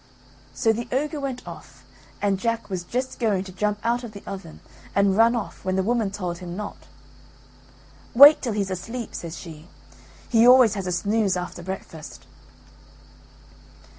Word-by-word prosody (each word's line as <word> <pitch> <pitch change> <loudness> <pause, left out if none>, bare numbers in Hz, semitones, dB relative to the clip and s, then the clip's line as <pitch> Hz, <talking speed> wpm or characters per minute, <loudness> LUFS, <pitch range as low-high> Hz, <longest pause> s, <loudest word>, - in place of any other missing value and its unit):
So 220 +12 +2
the 235 +2 -5
ogre 295 +4 -1
went 265 -6 -5
off, 140 -6 -12 0.4
and 200 -2 +1
Jack 230 -1 -2
was 180 -2 -3
just 255 +8 -4
going 210 -6 +1
to 190 - -10
jump 210 +3 -1
out 240 +2 0
of 230 -3 -8
the 200 - -10
oven 190 -5 -8 0.4
and 200 -1 +3
run 230 +3 +5
off 230 - -5
when 185 0 -1
the 190 - +1
woman 225 -1 0
told 180 -4 -5
him 175 -1 -7
not. 210 0 -7 1.3
"Wait 285 +5 +9
till 235 -5 -2
he's 200 -2 -2
asleep," 225 +6 -5
says 165 -1 -6
she; 160 -2 -11 0.6
"he 230 0 +4
always 250 -4 +7
has 195 -3 -4
a - - -1
snooze 200 +1 +1
after 180 0 -6
breakfast." 170 -4 -8
205 Hz, 165 wpm, -24 LUFS, 185-235 Hz, 1.3 s, Wait